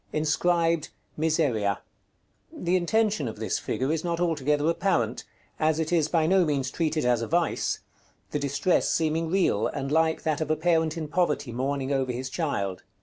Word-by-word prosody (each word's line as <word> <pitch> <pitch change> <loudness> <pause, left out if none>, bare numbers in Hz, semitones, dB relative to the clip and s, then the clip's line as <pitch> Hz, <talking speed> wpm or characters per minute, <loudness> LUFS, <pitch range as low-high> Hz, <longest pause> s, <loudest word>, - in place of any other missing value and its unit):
Inscribed 165 +1 +1 0.3
"MISERIA." 145 - +1 0.7
The 180 +1 -1
intention 200 - +1
of 110 - -5
this 110 -3 -2
figure 130 +3 -2
is 160 - -2
not 170 -1 -1
altogether 150 -3 +1
apparent, 165 - 0 0.3
as 155 0 +2
it 160 +1 -1
is 160 -3 +3
by 165 -2 +2
no 185 +2 +4
means 140 -4 -1
treated 155 -4 -1
as 120 -2 +2
a 115 - -2
vice; 170 +1 0 0.5
the 150 - -1
distress 140 +5 +1
seeming 160 0 0
real, 175 - +2
and 135 -1 -4
like 160 +1 +2
that 155 -1 0
of 155 - -2
a 155 - +3
parent 160 0 +1
in 155 -2 -3
poverty 150 -5 0
mourning 135 +3 -1
over 135 -2 0
his 130 +2 -5
child. 100 - -2
155 Hz, 170 wpm, -26 LUFS, 135-165 Hz, 0.7 s, no